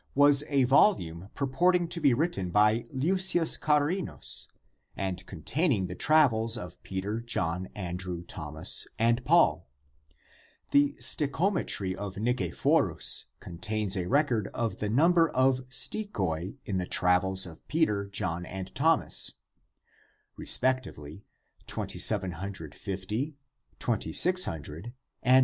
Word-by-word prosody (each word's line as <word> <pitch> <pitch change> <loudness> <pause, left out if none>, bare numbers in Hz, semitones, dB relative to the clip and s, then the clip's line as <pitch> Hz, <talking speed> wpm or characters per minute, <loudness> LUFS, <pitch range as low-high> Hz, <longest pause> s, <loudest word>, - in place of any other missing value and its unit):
114) 145 +1 +5
was - - +5
a - - +4
volume 95 - +2
purporting 175 +6 +1
to 170 0 -4
be 140 -3 +4
written 120 - -1
by 105 +4 +2
Leucius 175 +4 +3
Charinus 155 +4 -1 0.5
and 95 -1 -4
containing 120 - -1
the 90 - -6
travels 115 -4 +3
of 90 -2 -9
Peter, 95 +4 -4
John, 95 -6 -1
Andrew, 90 -2 -5
Thomas 80 -2 -1
and 115 +2 +1
Paul. 150 - +3 1.0
The 145 0 +3
stichometry 140 - +1
of 100 0 -7
Nicephorus 110 -5 +1
contains 105 +3 -2
a 90 -2 -2
record 125 -7 +1
of 115 -2 -2
the 105 - -3
number 165 +7 +3
of 130 0 +2
stichoi 125 - -1
in 95 -2 -2
the 90 - -3
travels 95 +1 +3
of 80 -3 -13
Peter, 105 -11 0
John, 90 -3 -2
and 95 +1 -8
Thomas, 160 +4 +1 1.0
respectively, 105 - -1 0.3
viz.: - - -25
2,750, 95 - -2 0.4
2,600, 85 - 0
1,600. 120 - -9
110 Hz, 110 wpm, -28 LUFS, 95-145 Hz, 1.0 s, 114